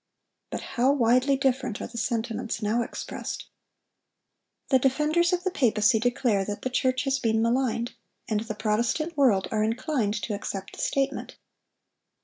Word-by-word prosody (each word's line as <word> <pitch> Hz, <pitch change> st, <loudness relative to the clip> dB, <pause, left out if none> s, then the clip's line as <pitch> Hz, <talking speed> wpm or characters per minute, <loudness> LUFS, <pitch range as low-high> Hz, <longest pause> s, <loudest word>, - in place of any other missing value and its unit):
But -, -, -4 dB
how 260 Hz, +1 st, +1 dB
widely 255 Hz, +1 st, +3 dB
different 260 Hz, -4 st, 0 dB
are -, -, -4 dB
the 235 Hz, -, -6 dB
sentiments 230 Hz, -1 st, -2 dB
now 220 Hz, +3 st, +1 dB
expressed. -, -, -5 dB, 1.2 s
The 265 Hz, -, +5 dB
defenders 300 Hz, +7 st, +2 dB
of 360 Hz, 0 st, 0 dB
the 375 Hz, -, 0 dB
papacy 220 Hz, -6 st, +3 dB
declare 235 Hz, -3 st, +1 dB
that 205 Hz, +1 st, -5 dB
the 255 Hz, -, -2 dB
church 255 Hz, 0 st, +1 dB
has 270 Hz, -1 st, 0 dB
been 225 Hz, -2 st, +1 dB
maligned; 235 Hz, 0 st, 0 dB, 0.3 s
and 215 Hz, -2 st, 0 dB
the 220 Hz, 0 st, -5 dB
Protestant 235 Hz, +10 st, 0 dB
world 240 Hz, -10 st, +3 dB
are 215 Hz, -1 st, +1 dB
inclined 225 Hz, -1 st, 0 dB
to 220 Hz, -, -2 dB
accept 195 Hz, -1 st, -5 dB
the -, -, -6 dB
statement. 275 Hz, -1 st, -1 dB
240 Hz, 150 wpm, -26 LUFS, 220-270 Hz, 1.2 s, The